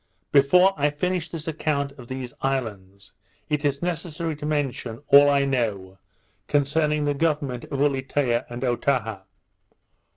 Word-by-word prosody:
Before 180 +7 +5
I 145 +1 +2
finish 175 +3 -2
this 160 -1 -7
account 145 -3 -1
of 130 -4 -13
these 130 -1 -6
islands, 100 -7 -4 0.4
it 150 0 -1
is 140 +1 0
necessary 165 -1 -3
to 150 - -5
mention 135 -4 -2
all 140 +1 +8
I 140 -1 +3
know 105 -8 -2 0.5
concerning 150 +1 +1
the 145 - +1
government 145 -5 -1
of 140 -2 -4
Ulietea 135 -3 +1
and 120 +1 -6
Otaha. 120 -4 0
140 Hz, 135 wpm, -24 LUFS, 125-150 Hz, 0.5 s, all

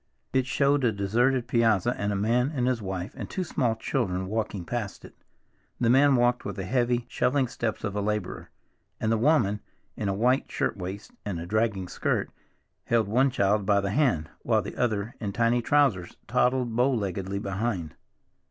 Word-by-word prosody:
It 130 -1 +2
showed 140 +1 +2
a 120 - +3
deserted 120 +6 +1
piazza, 115 -2 +2
and 100 0 -2
a - - -1
man 120 +7 +1
and 125 -2 +1
his 125 -3 0
wife 95 -1 -4
and - - -6
two 185 - -2
small 125 -9 0
children 110 -6 -1
walking 105 -3 -3
past 110 -3 -4
it. - - -13 0.7
The 120 -1 +3
man 140 +2 +5
walked 120 0 +2
with - - -5
the 95 - -4
heavy, 120 +2 +1
shuffling 130 +1 +1
steps 115 -2 -3
of 100 -2 -3
a 105 - 0
laborer, 105 -2 -3 0.5
and 110 - 0
the 115 - +3
woman, 115 -7 +3 0.4
in 100 - -2
a - - +1
white 125 +6 +1
shirt - - -1
waist 95 +2 -7
and 95 -5 -3
a 85 - -5
dragging 105 -1 0
skirt, - - -1 0.5
held 115 -3 +2
one 130 +6 +3
child 105 -4 +1
by 100 -1 +4
the 100 0 -2
hand, 120 - +1
while - - +1
the - - -7
other, 110 -2 -1
in 100 -3 -3
tiny 120 +2 +2
trousers, 120 -9 +2
toddled 125 -2 +1
bow 125 +3 +3
leggedly 100 -4 -2
behind. 95 -5 -3
115 Hz, 185 wpm, -27 LUFS, 100-125 Hz, 0.7 s, man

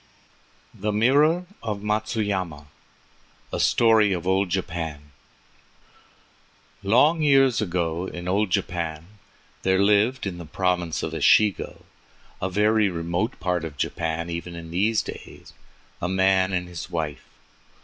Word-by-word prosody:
THE 105 +2 -3
MIRROR 145 +11 +3 0.2
OF 105 -2 -4
MATSUYAMA 105 -7 -2 0.9
A - - -1
STORY 110 -3 +4
OF 90 -1 -4
OLD 95 0 +1
JAPAN 80 -5 -4 1.7
Long 130 +11 +4
years 135 -5 +4
ago 85 -2 -2
in 90 -1 -7
old 100 +2 +1
Japan 85 -3 -2 0.6
there 95 0 +2
lived 105 +6 +2
in 90 -3 -4
the 85 - -8
Province 90 0 -1
of - - -3
Echigo, 105 -3 +2 0.6
a 95 - -1
very 105 +2 +2
remote 85 +6 -2
part 90 -2 -1
of 75 -3 -7
Japan 80 +3 -2
even 85 +1 -5
in 85 -1 -9
these 105 +5 +1
days, - - -10 0.5
a 90 - -1
man 95 0 +2
and 90 -1 -2
his 90 -1 -7
wife. 80 -4 -4
95 Hz, 125 wpm, -24 LUFS, 85-105 Hz, 1.7 s, STORY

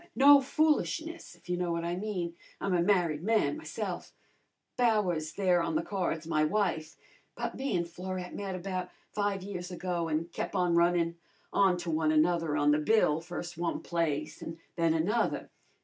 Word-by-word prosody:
No 280 +1 +8
foolishness, 315 - 0
if 175 - -23
you 180 0 -1
know 175 -1 -1
what 170 0 -2
I 170 +1 -1
mean. 180 -4 -3 0.2
I'm 195 - -1
a 175 - +3
married 175 -5 +2
man 220 - +2
myse'f 315 - -5 0.6
Bowers 190 -10 +1
there 180 -3 +3
on 165 -1 -1
the 160 - +1
card's 175 -5 -2
my 155 -2 +1
wife 160 -2 0 0.4
but - - -3
me 265 -8 -1
an' 170 - 0
Florette 180 +1 -6
met 195 -2 -4
about 185 0 -3 0.2
five 205 -2 -1
years 185 -2 -5
ago, 175 -2 -2
an' 155 +1 0
kep' 175 - -3
on 175 -1 +2
runnin' 170 0 +3 0.4
on 190 -3 +4
to 175 -1 -3
one 155 0 +2
another 160 -1 +2
on 145 0 +4
the 150 - +3
bill, 160 -3 +3
first 175 0 -6
one 170 -1 -1
place 155 -3 -1
an' 165 - -6 0.2
then 165 -2 +2
another. 205 +9 0
175 Hz, 175 wpm, -30 LUFS, 165-195 Hz, 0.6 s, No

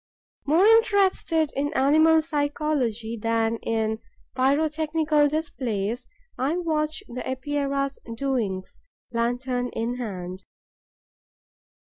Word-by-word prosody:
More 325 +7 +5
interested 395 -8 +3
in 290 +1 0
animal 315 +4 +5
psychology 290 -7 -1
than 225 +1 0
in 220 -1 -1 0.4
pyrotechnical 300 +2 +2
displays, 250 -7 -2 0.3
I 280 +7 +1
watch 310 -3 -1
the 250 +1 -6
Epeira's 275 +1 -2 0.2
doings, 225 -8 -2 0.3
lantern 245 +1 -1
in 235 +2 -2
hand. 185 -5 -5
275 Hz, 85 wpm, -25 LUFS, 230-310 Hz, 0.4 s, More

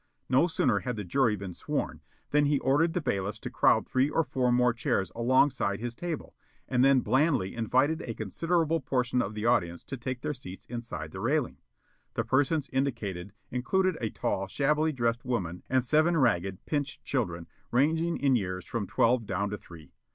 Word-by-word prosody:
No 130 +7 +4
sooner 165 -4 +1
had 125 -2 -3
the 105 - -4
jury 115 +3 +2
been 95 -2 -6
sworn - - -3 0.3
than 150 0 +4
he 145 0 +3
ordered 145 +5 +2
the 180 - -1
bailiffs 100 -6 -2
to - - -5
crowd - - +3
three 130 +2 +2
or 165 +2 +2
four 130 -4 0
more 125 0 +3
chairs 100 -4 -1
alongside 120 -4 +2
his 120 +1 -4
table, 165 +4 -5 0.3
and 125 -1 +2
then 135 -1 +5
blandly 130 - +2
invited 130 +7 +1
a 115 - -5
considerable 165 - 0
portion 125 -3 0
of 100 +2 -4
the 105 +1 -3
audience 85 -8 +1
to 135 - -6
take 125 +1 -4
their 150 +1 -2
seats 100 -5 -10
inside 120 -10 -6
the 95 - -7
railing. 130 +5 0 0.6
The - - 0
persons 145 +3 +1
indicated 105 -9 -2 0.2
included 185 +9 +1
a 110 - 0
tall, 95 -1 -2
shabbily 150 +8 +1
dressed 120 -3 -1
woman 90 -9 -2
and 130 -1 +2
seven 155 +5 +3
ragged, 95 - +1
pinched 145 -1 -3
children, 90 -11 -2 0.2
ranging 160 +7 +2
in 135 -2 +3
years 95 -4 -2
from 115 -5 -3
twelve 115 -2 +2
down 100 +2 -1
to 105 - -3
three. 80 -4 -14
125 Hz, 180 wpm, -29 LUFS, 105-145 Hz, 0.6 s, then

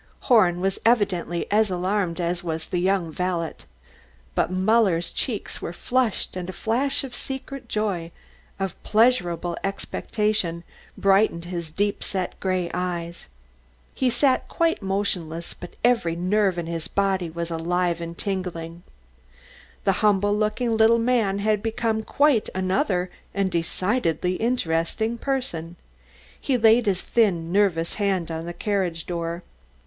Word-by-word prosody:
Horn 180 -8 +4
was 195 +1 0
evidently 195 -7 +2
as 215 0 +4
alarmed 185 -1 -1
as 175 0 -1
was 160 -1 -3
the 180 - -2
young 185 -2 +1
valet. 175 -1 -1 0.8
But - - +1
Muller's 185 -2 +2
cheeks - - -3
were - - -4
flushed 250 -7 0
and 180 0 -4
a - - -5
flash 250 +10 0
of 255 -2 -7
secret 270 -1 -6
joy, 195 -6 -1 0.5
of 195 -2 -3
pleasurable 180 -7 +2
expectation, 195 -3 -1 0.3
brightened 195 -3 +3
his 170 -2 -4
deep 205 +6 -1
set, 185 -2 -3
grey 185 -2 -1
eyes. 175 -1 -3 0.7
He 260 - +1
sat 260 +1 +2
quite 330 -4 +1
motionless, 185 -4 -2
but 175 - -11
every 230 -9 +3
nerve 185 +1 +1
in 170 - -2
his 165 -1 -4
body 195 -3 0
was 170 +1 -4
alive 170 +1 0
and 170 0 -6
tingling. 175 -4 -4 1.0
The 195 - +4
humble 205 -1 +3
looking 220 +2 0
little 220 +1 +5
man 230 -4 +2
had 210 0 +1
become 225 0 -1
quite 280 0 +2
another 185 -1 0 0.2
and 195 -1 +1
a 170 - +1
decidedly 180 0 0
interesting 220 0 0
person. 200 - -2 0.7
He 265 -3 +1
laid 225 0 +5
his 190 -2 +1
thin, 175 -8 +1
nervous 180 -4 +2
hand 190 -5 0
on 165 +1 -4
the 175 - -4
carriage 180 -3 -1
door. 170 0 -3
190 Hz, 135 wpm, -24 LUFS, 170-220 Hz, 1.0 s, little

